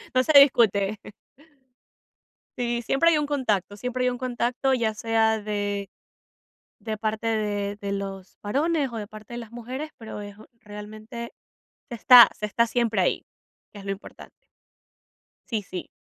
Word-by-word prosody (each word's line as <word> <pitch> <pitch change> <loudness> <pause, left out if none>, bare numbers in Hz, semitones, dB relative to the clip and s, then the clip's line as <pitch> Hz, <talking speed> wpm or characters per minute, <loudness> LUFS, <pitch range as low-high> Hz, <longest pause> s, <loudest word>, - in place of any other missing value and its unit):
No 255 - +4
se 310 - +1
discute. 215 -6 +4 1.6
Sí, 240 -1 -1
siempre 275 +8 +3
hay 310 - +3
un 295 - 0
contacto 210 -9 -1
siempre 250 +2 -2
hay - - +3
un 245 - -4
contacto, 250 +1 -1
ya 225 -3 +1
sea 220 0 +1
de 205 -2 -3 0.9
de 220 -1 -4
parte 220 +1 -2
de 205 -2 -1
de 200 -1 -5
los 195 -1 -6
varones, 280 +4 0
o 230 - -5
de 210 -2 -5
parte 215 +2 -12
de - - -5
las 230 -1 -10
mujeres, 255 +6 -6
pero, 220 -2 -8
es 205 0 -9 0.3
realmente 215 +3 -9 0.6
se - - -4
está 245 +1 +9
se 210 - -3
está 235 +3 +1
siempre 230 -4 0
ahí, 180 - 0 0.5
es 200 -1 -10
lo 195 - -4
importante. 200 - -12 1.1
Sí, 220 -3 -1
sí. 180 -1 -7
220 Hz, 155 wpm, -25 LUFS, 205-245 Hz, 1.6 s, está